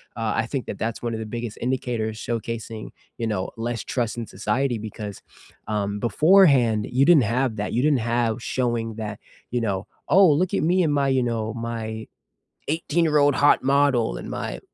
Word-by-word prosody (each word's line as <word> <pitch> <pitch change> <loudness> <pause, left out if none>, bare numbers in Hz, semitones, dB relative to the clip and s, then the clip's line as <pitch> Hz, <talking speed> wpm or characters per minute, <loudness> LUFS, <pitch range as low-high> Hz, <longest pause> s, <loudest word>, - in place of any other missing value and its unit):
uh, 115 -2 -1
I 110 - +1
think 130 +1 -4
that 100 - -5
that's 115 +1 -3
one 120 -1 -2
of - - -5
the 110 - -4
biggest 115 0 -5
indicators 120 -3 -2
showcasing, 115 -1 -4 0.3
you 115 - -2
know, 105 -4 -2
less 115 -1 -3
trust 120 -2 -2
in 115 - -4
society 115 +6 -1
because, 105 -1 -7 0.4
um, 105 -1 -2
beforehand, 135 - +4
you 130 +2 +3
didn't 160 -7 +6
have 120 +1 0
that. 105 -1 -3
You 120 - +1
didn't 145 -5 +2 0.2
have 115 0 0
showing 120 -3 -1
that, 105 -2 -5 0.3
you 125 - -1
know, 100 -3 -2 0.2
"Oh, 190 -2 +6
look 185 +6 +1
at - - +1
me 180 +2 +3
and 150 -2 +1
my," 140 -1 +2
you 130 -2 +2
know, 115 -2 -2
"my 115 -1 -5 0.6
18 165 +1 0
year 150 -2 +3
old 145 -1 +4
hot 145 -2 +4
model 135 - +2
and - - -7
my," - - -4
115 Hz, 190 wpm, -24 LUFS, 110-135 Hz, 0.6 s, didn't